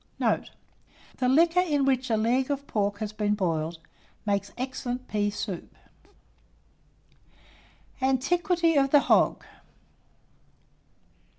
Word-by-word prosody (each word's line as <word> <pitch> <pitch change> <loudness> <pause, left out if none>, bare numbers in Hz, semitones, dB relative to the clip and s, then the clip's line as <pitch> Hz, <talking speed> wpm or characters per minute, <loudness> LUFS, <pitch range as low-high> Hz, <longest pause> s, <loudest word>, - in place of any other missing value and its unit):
Note. - - 0 0.7
The 250 - +1
liquor 330 +6 +4
in 295 -6 +1
which 260 -1 +1
a 220 - +2
leg 245 +5 +1
of 280 0 -2
pork 205 -4 -1
has 215 0 -5
been 210 -1 0
boiled, 165 -4 -2 0.5
makes 200 -1 -1
excellent 255 0 -4
pea 205 -1 0
soup. 200 -3 -6 2.3
ANTIQUITY 330 +5 +1
OF 275 -1 +3
THE 290 0 +6
HOG. - - +2
255 Hz, 105 wpm, -27 LUFS, 205-280 Hz, 2.3 s, THE